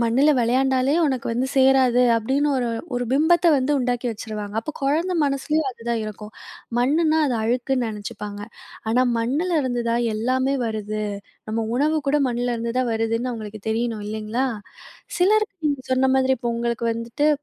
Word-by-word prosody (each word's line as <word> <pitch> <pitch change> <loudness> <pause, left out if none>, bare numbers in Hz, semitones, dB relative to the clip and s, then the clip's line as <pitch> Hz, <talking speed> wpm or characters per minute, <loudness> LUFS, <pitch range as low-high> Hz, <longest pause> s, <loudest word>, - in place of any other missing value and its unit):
மண்ணுல 245 +6 +3
வெளையாண்டாலே 260 +3 +2
உனக்கு 260 -5 -1
வந்து 245 +3 0
சேராது, 260 -2 +4
அப்டீன்னு 265 +6 +1
ஒரு 245 -2 0 0.3
ஒரு 245 0 -1
பிம்பத்த 330 +5 +3
வந்து 265 +2 0
உண்டாக்கி 245 -1 -1
வச்சுருவாங்க. 210 -2 -6
அப்ப 230 - -5
குழந்த 315 +7 +1
மனசுலயும் 280 +1 0
அதுதான் 235 -1 -3
இருக்கும். 215 0 -8 0.5
மண்ணுனா, 310 +5 +2
அது 255 - 0
அழுக்குன்னு 245 +2 0
நெனைச்சுப்பாங்க. 210 -1 -6 0.5
ஆனா, 250 +2 +3 0.2
மண்ணுலருந்துதான் 245 -4 0
எல்லாமே 260 +5 0
வருது. 215 -1 -3 0.5
நம்ம 225 +1 -1
உணவு 305 +4 +2
கூட 295 +1 +3
மண்ணுலருந்துதான் 240 0 -1
வருதுன்னு 230 +2 -1
அவங்களுக்கு 215 -2 -7
தெரியணும், 225 -1 -1
இல்லீங்களா. 220 +4 -2 0.7
சிலருக்கு 415 +2 +3
நீங்க 285 -3 -1
சொன்ன 260 +1 +3
மாதிரி, 265 0 +3
இப்போ 240 0 -2
உங்களுக்கு 235 0 -1
வந்துட்டு, 230 +6 -1
245 Hz, 140 wpm, -23 LUFS, 230-270 Hz, 0.7 s, சேராது